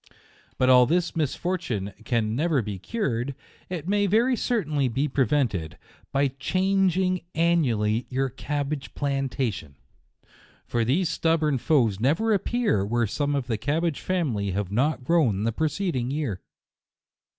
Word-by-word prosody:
But 130 Hz, -, +2 dB
although 130 Hz, +4 st, +6 dB
this 180 Hz, -1 st, -1 dB
misfortune 150 Hz, -, -2 dB
can 115 Hz, -3 st, 0 dB
never 150 Hz, -2 st, +1 dB
be 100 Hz, -2 st, -5 dB
cured, 135 Hz, -, -2 dB, 0.3 s
it 175 Hz, -3 st, -5 dB
may 205 Hz, +1 st, +2 dB
very 235 Hz, +6 st, +3 dB
certainly 155 Hz, -, 0 dB
be 135 Hz, +5 st, 0 dB
prevented, 130 Hz, -, 0 dB, 0.3 s
by 140 Hz, 0 st, +2 dB
changing 185 Hz, +2 st, +1 dB
annually 125 Hz, -10 st, +1 dB
your 135 Hz, +1 st, 0 dB
cabbage 140 Hz, +2 st, -4 dB
plantation; 135 Hz, -, -2 dB, 0.9 s
for 120 Hz, -, 0 dB
these 155 Hz, +10 st, +1 dB
stubborn, 155 Hz, -4 st, +1 dB
foes 115 Hz, -9 st, +2 dB
never 165 Hz, -, +2 dB
appear 205 Hz, -, +1 dB
where 115 Hz, +3 st, +1 dB
some 145 Hz, +7 st, -1 dB
of 140 Hz, -3 st, -1 dB
the 115 Hz, -4 st, -2 dB
cabbage 155 Hz, +5 st, -1 dB
family 135 Hz, -, -1 dB
have 100 Hz, -1 st, -2 dB
not 130 Hz, +5 st, +1 dB
grown 125 Hz, -, +2 dB
the 115 Hz, -, +1 dB
preceding 155 Hz, -, -1 dB
year. 135 Hz, -10 st, -3 dB
140 Hz, 130 wpm, -25 LUFS, 115-170 Hz, 0.9 s, although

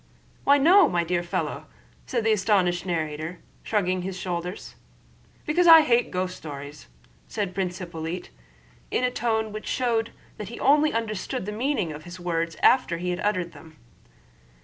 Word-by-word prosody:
"Why 285 Hz, +1 st, +6 dB
no, 340 Hz, +4 st, +6 dB
my 175 Hz, -1 st, +1 dB
dear 175 Hz, +1 st, 0 dB
fellow," 175 Hz, -, -3 dB, 0.4 s
said 235 Hz, -3 st, -1 dB
the 225 Hz, -, +3 dB
astonished 190 Hz, -4 st, +1 dB
narrator, 160 Hz, 0 st, -3 dB, 0.2 s
shrugging 185 Hz, -4 st, 0 dB
his 190 Hz, +1 st, -5 dB
shoulders. 180 Hz, 0 st, -5 dB, 0.7 s
"Because 345 Hz, +4 st, +2 dB
I 325 Hz, -1 st, +11 dB
hate 245 Hz, -5 st, +2 dB
ghost 185 Hz, 0 st, -2 dB
stories," 145 Hz, -, -9 dB, 0.4 s
said 200 Hz, -4 st, -3 dB
Prince 185 Hz, -1 st, -2 dB
Hippolyte 170 Hz, -1 st, -6 dB, 0.6 s
in -, -, 0 dB
a 250 Hz, -, +2 dB
tone 220 Hz, -3 st, -1 dB
which 215 Hz, +1 st, -7 dB
showed 230 Hz, -3 st, 0 dB, 0.3 s
that 210 Hz, -2 st, -6 dB
he 235 Hz, -, -8 dB
only 300 Hz, +2 st, +4 dB
understood 225 Hz, +1 st, -3 dB
the 210 Hz, -, -4 dB
meaning 230 Hz, -, -1 dB
of 155 Hz, 0 st, -9 dB
his 175 Hz, +1 st, -9 dB
words 170 Hz, -2 st, -2 dB
after 245 Hz, -10 st, +4 dB
he 180 Hz, +1 st, -2 dB
had 175 Hz, -, -3 dB
uttered 185 Hz, -5 st, -1 dB
them. 160 Hz, -2 st, -15 dB
185 Hz, 160 wpm, -25 LUFS, 175-230 Hz, 0.7 s, I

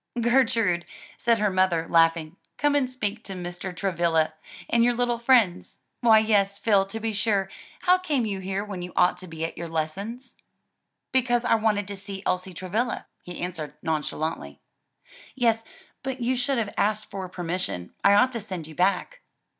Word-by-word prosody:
"Gertude," 230 Hz, -7 st, +2 dB, 0.3 s
said 235 Hz, 0 st, +3 dB
her 210 Hz, -2 st, +1 dB
mother, 185 Hz, -3 st, +2 dB
laughing 165 Hz, -1 st, +3 dB, 0.2 s
"come 290 Hz, -1 st, +2 dB
and 280 Hz, -3 st, +2 dB
speak 220 Hz, -4 st, -3 dB
to 195 Hz, -, -6 dB
Mr. 175 Hz, +1 st, -5 dB
Travilla 170 Hz, -4 st, +1 dB, 0.3 s
and 235 Hz, 0 st, +3 dB
your 240 Hz, 0 st, +3 dB
little 240 Hz, -1 st, 0 dB
friends. 230 Hz, -8 st, +3 dB, 0.2 s
Why 225 Hz, -2 st, +6 dB
yes, 205 Hz, -2 st, +2 dB
Phil, 200 Hz, -3 st, +3 dB
to 225 Hz, +3 st, -5 dB
be 225 Hz, 0 st, -2 dB
sure; 200 Hz, -2 st, 0 dB, 0.3 s
how 365 Hz, 0 st, +4 dB
came 295 Hz, -10 st, 0 dB
you 200 Hz, -3 st, -3 dB
here 195 Hz, +2 st, -3 dB
when 200 Hz, -4 st, -6 dB
you 180 Hz, 0 st, -7 dB
ought 180 Hz, 0 st, +4 dB
to 185 Hz, +1 st, -10 dB
be 165 Hz, -1 st, -4 dB
at 165 Hz, -, -6 dB
your 170 Hz, -, -4 dB
lessons?" 195 Hz, +11 st, -4 dB, 0.8 s
"Because 245 Hz, -2 st, +2 dB
I -, -, +3 dB
wanted 215 Hz, -3 st, +1 dB
to 200 Hz, -, -5 dB
see 195 Hz, 0 st, -7 dB
Elsie 185 Hz, 0 st, -1 dB
Travilla," 210 Hz, +8 st, -2 dB, 0.2 s
he 175 Hz, -1 st, -9 dB
answered 160 Hz, -5 st, -5 dB
nonchalantly. 155 Hz, -, -3 dB, 0.8 s
"Yes, 230 Hz, -3 st, +2 dB, 0.4 s
but 265 Hz, 0 st, -4 dB
you 245 Hz, +2 st, +1 dB
should 265 Hz, +2 st, 0 dB
have 215 Hz, -3 st, -2 dB
asked 215 Hz, +1 st, 0 dB
for 190 Hz, -2 st, -5 dB
permission. 175 Hz, -, -3 dB
I 200 Hz, 0 st, +6 dB
ought 255 Hz, +5 st, +5 dB
to 230 Hz, -3 st, -4 dB
send 185 Hz, -6 st, -6 dB
you 160 Hz, -, -11 dB
back." 200 Hz, -, 0 dB
200 Hz, 175 wpm, -26 LUFS, 175-235 Hz, 0.8 s, Why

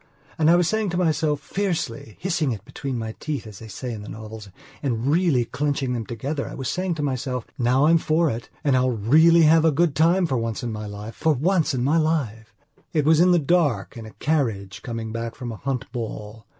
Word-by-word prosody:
And 155 Hz, 0 st, +4 dB
I 170 Hz, -, +7 dB
was 175 Hz, -1 st, +3 dB
saying 220 Hz, +1 st, 0 dB
to 175 Hz, -, -2 dB
myself, 155 Hz, -4 st, +1 dB
fiercely, 165 Hz, -, -3 dB
hissing 170 Hz, -6 st, 0 dB
it 105 Hz, -3 st, -6 dB
between 135 Hz, -1 st, -5 dB
my 110 Hz, -1 st, -4 dB
teeth, 150 Hz, -4 st, -4 dB
as 105 Hz, -3 st, -10 dB
they 115 Hz, -, -10 dB
say 125 Hz, +3 st, -6 dB
in 110 Hz, -, -7 dB
novelsand 110 Hz, 0 st, -9 dB, 0.3 s
really 135 Hz, +2 st, +1 dB
clenching 140 Hz, 0 st, -1 dB
them 115 Hz, -3 st, -4 dB
together: 135 Hz, +5 st, -3 dB
I -, -, -7 dB
was 135 Hz, -2 st, -3 dB
saying 185 Hz, -1 st, -1 dB
to 150 Hz, -, -3 dB
myself: 130 Hz, -3 st, -2 dB
'Now, 125 Hz, +4 st, +3 dB
I'm 160 Hz, -, +5 dB
in 165 Hz, -, +6 dB
for 160 Hz, +2 st, +2 dB
it 115 Hz, +1 st, -6 dB
and 140 Hz, -4 st, +3 dB
I'll 130 Hz, 0 st, +3 dB
really 155 Hz, +10 st, +5 dB
have 160 Hz, +1 st, +5 dB
a 160 Hz, -, +4 dB
good 160 Hz, +1 st, +2 dB
time 170 Hz, +4 st, +3 dB
for 135 Hz, -6 st, 0 dB
once 115 Hz, -1 st, -3 dB
in 120 Hz, -, -2 dB
my 105 Hz, -1 st, -5 dB
lifefor 110 Hz, +9 st, -2 dB
once 165 Hz, 0 st, +1 dB
in 125 Hz, -, -1 dB
my 150 Hz, +5 st, +3 dB
life!' 140 Hz, -9 st, -1 dB, 0.4 s
It 150 Hz, -3 st, +1 dB
was 160 Hz, 0 st, +5 dB
in 180 Hz, +1 st, +5 dB
the 175 Hz, -, +5 dB
dark, 145 Hz, -, +1 dB
in 115 Hz, -2 st, -8 dB
a 110 Hz, -, -13 dB
carriage, 115 Hz, -11 st, -1 dB
coming 115 Hz, -2 st, -5 dB
back 115 Hz, 0 st, -4 dB
from 120 Hz, -2 st, -6 dB
a 110 Hz, -, -7 dB
hunt 130 Hz, 0 st, -3 dB
ball. 110 Hz, -2 st, -6 dB
135 Hz, 220 wpm, -23 LUFS, 115-160 Hz, 0.4 s, I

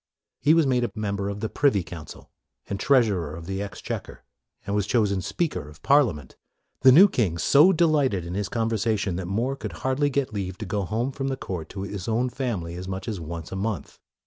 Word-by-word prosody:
He 155 Hz, +3 st, +4 dB
was 165 Hz, -2 st, +4 dB
made 125 Hz, -2 st, +2 dB
a 120 Hz, -, 0 dB
member 100 Hz, -2 st, -2 dB
of 100 Hz, 0 st, -5 dB
the 110 Hz, -, 0 dB
Privy 120 Hz, -7 st, +2 dB
Council, 85 Hz, -3 st, -10 dB, 0.4 s
and 100 Hz, -, -4 dB
Treasurer 100 Hz, -, +2 dB
of 85 Hz, 0 st, -8 dB
the 95 Hz, +2 st, -3 dB
Exchequer, 100 Hz, -1 st, -6 dB, 0.4 s
and 100 Hz, +1 st, -2 dB
was 105 Hz, -2 st, 0 dB
chosen 100 Hz, -5 st, +1 dB
Speaker 145 Hz, -, -2 dB
of 75 Hz, -, -17 dB
Parliament. 115 Hz, -, +2 dB, 0.4 s
The 130 Hz, 0 st, +8 dB
new 180 Hz, +10 st, +9 dB
king 105 Hz, -, 0 dB
so 145 Hz, -, +6 dB
delighted 150 Hz, -, +2 dB
in 85 Hz, -, -5 dB
his 100 Hz, 0 st, -2 dB
conversation 110 Hz, -4 st, 0 dB
that 90 Hz, -1 st, -4 dB
More 115 Hz, +8 st, -1 dB
could -, -, -6 dB
hardly 135 Hz, +2 st, +2 dB
get 135 Hz, -4 st, -1 dB
leave 95 Hz, -3 st, -4 dB
to 110 Hz, -, -6 dB
go 100 Hz, +1 st, -2 dB
home 115 Hz, +7 st, -1 dB
from 135 Hz, 0 st, -4 dB
the 135 Hz, -1 st, -2 dB
court 85 Hz, -8 st, -5 dB
to -, -, -13 dB
34 -, -, -3 dB
MORE -, -, -7 dB
his 95 Hz, -3 st, -5 dB
own 120 Hz, +3 st, +1 dB
family 115 Hz, -11 st, -3 dB
as 90 Hz, +1 st, -6 dB
much 95 Hz, 0 st, -5 dB
as 105 Hz, -5 st, -3 dB
once 80 Hz, 0 st, -7 dB
a -, -, -4 dB
month. 100 Hz, 0 st, -4 dB
105 Hz, 220 wpm, -25 LUFS, 95-130 Hz, 0.4 s, new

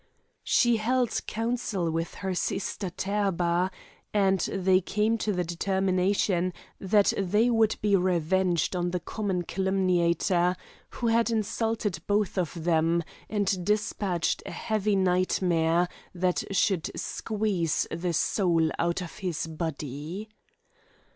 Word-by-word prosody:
She 240 Hz, -2 st, +3 dB
held 245 Hz, +2 st, +1 dB
counsel 225 Hz, -6 st, -1 dB
with 165 Hz, +1 st, -3 dB
her 190 Hz, -, 0 dB
sister 190 Hz, +1 st, -2 dB
Therba, 185 Hz, -2 st, 0 dB, 0.5 s
and 195 Hz, -2 st, +3 dB
they 190 Hz, 0 st, +2 dB
came 215 Hz, +4 st, +1 dB
to 210 Hz, -, 0 dB
the 180 Hz, -2 st, 0 dB
determination 185 Hz, +1 st, +1 dB, 0.3 s
that 200 Hz, +1 st, +3 dB
they 210 Hz, +5 st, +2 dB
would 225 Hz, -2 st, +3 dB
be 205 Hz, -1 st, +4 dB
revenged 180 Hz, 0 st, +1 dB
on 175 Hz, 0 st, 0 dB
the 180 Hz, 0 st, -2 dB
common 190 Hz, -2 st, -2 dB
calumniator, 180 Hz, -1 st, +1 dB, 0.3 s
who 240 Hz, -, -5 dB
had 230 Hz, 0 st, +3 dB
insulted 220 Hz, -4 st, -1 dB
both 205 Hz, -2 st, +1 dB
of 170 Hz, -1 st, -3 dB
them, 165 Hz, 0 st, +2 dB, 0.3 s
and 200 Hz, -3 st, 0 dB
despatched 200 Hz, -4 st, 0 dB
a -, -, -5 dB
heavy 215 Hz, -2 st, 0 dB
nightmare, 180 Hz, -2 st, +2 dB, 0.3 s
that 180 Hz, 0 st, 0 dB
should 190 Hz, -3 st, +1 dB
squeeze 205 Hz, -7 st, -1 dB
the 175 Hz, 0 st, -2 dB
soul 165 Hz, -2 st, +2 dB
out 170 Hz, +2 st, 0 dB
of 175 Hz, -, -10 dB
his 180 Hz, -5 st, -2 dB
body. 160 Hz, +4 st, -5 dB
185 Hz, 120 wpm, -27 LUFS, 175-210 Hz, 0.5 s, be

